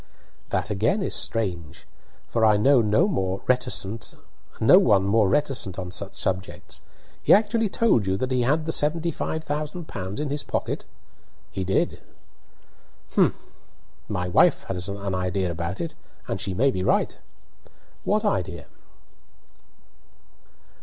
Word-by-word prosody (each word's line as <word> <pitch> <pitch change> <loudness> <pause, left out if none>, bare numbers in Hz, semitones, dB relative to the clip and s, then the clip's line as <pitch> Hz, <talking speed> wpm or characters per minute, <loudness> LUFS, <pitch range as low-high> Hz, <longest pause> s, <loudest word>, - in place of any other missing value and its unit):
"That - - -1
again 110 - +1
is - - -2
strange, 85 -8 -2 0.4
for 115 - -1
I 105 -1 +5
know 130 +4 +5
no 110 - +3
one 200 - -1
more 95 -5 -2
reticent 115 -4 0 1.7
on 90 -2 -5
such 100 0 -2
subjects. 95 0 -3 0.4
He - - +1
actually 215 +1 +4
told 190 - +2
you 95 0 +1
that 130 +5 -2
he 125 -1 +2
had 150 +6 +1
the 160 - -1
seventy 165 +3 +1
five 160 +1 -3
thousand 155 +3 -4
pounds 95 +5 -6
in 150 -2 -2
his 145 0 -1
pocket?" - - -3 0.7
"He 95 - -3
did." 95 +1 0 1.1
"Humph! - - +3 0.7
My 90 0 -2
wife 90 - +4
has 90 0 -4
an 100 -1 -4
idea 90 0 -1
about 85 +2 -4
it, 165 -2 -4 0.3
and 95 - -2
she 95 -2 -1
may 135 +7 +3
be 95 - -3
right - - +1 0.5
" - - -29
"What 215 +2 +1
idea?" 90 - -1
105 Hz, 135 wpm, -24 LUFS, 95-150 Hz, 1.7 s, I